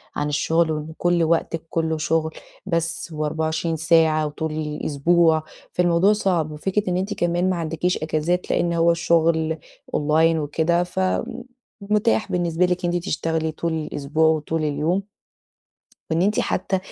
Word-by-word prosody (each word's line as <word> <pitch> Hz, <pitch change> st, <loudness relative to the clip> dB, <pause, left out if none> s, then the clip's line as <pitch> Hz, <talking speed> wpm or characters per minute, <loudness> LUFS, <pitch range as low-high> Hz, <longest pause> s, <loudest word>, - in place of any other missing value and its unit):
عن 145 Hz, -, -1 dB
الشغل، 160 Hz, +2 st, +1 dB
وإن 155 Hz, +1 st, -4 dB
كل 175 Hz, -1 st, +2 dB
وقتِك 165 Hz, 0 st, 0 dB
كلّه 160 Hz, -1 st, -1 dB
شُغل 160 Hz, +1 st, 0 dB, 0.3 s
بس 165 Hz, -2 st, -2 dB
و24 160 Hz, +2 st, -1 dB
ساعة 160 Hz, -1 st, +3 dB
وطول 155 Hz, +1 st, -4 dB
الأسبوع، 155 Hz, +2 st, +1 dB, 0.3 s
فالموضوع 175 Hz, +3 st, +3 dB
صعب 180 Hz, -7 st, 0 dB
وفكرة 190 Hz, +6 st, -1 dB
إن 180 Hz, -, 0 dB
أنتِ 195 Hz, +3 st, -2 dB
كمان 175 Hz, -1 st, 0 dB
ما 185 Hz, -, +1 dB
عندكيش 165 Hz, +1 st, -1 dB
إجازات 160 Hz, +3 st, -1 dB
لإن 170 Hz, -1 st, +1 dB
هو 170 Hz, 0 st, +4 dB
الشغل 165 Hz, -1 st, +2 dB, 0.4 s
online 160 Hz, +2 st, +3 dB
وكده 160 Hz, +4 st, +1 dB
فمُتاح 215 Hz, +3 st, -2 dB
بالنسبة 175 Hz, 0 st, +1 dB
لِك 180 Hz, 0 st, -1 dB
إن 175 Hz, -, 0 dB
أنتِ 175 Hz, +1 st, -2 dB
تشتغلي 160 Hz, -1 st, -1 dB
طُول 165 Hz, +1 st, -3 dB
الأسبوع 155 Hz, 0 st, 0 dB
وطُول 160 Hz, 0 st, 0 dB
اليوم. 155 Hz, +7 st, -1 dB, 1.0 s
وإن 165 Hz, +2 st, +2 dB
أنتِ 205 Hz, +3 st, +2 dB
حتى 190 Hz, -, -1 dB
165 Hz, 140 wpm, -22 LUFS, 155-175 Hz, 1.0 s, هو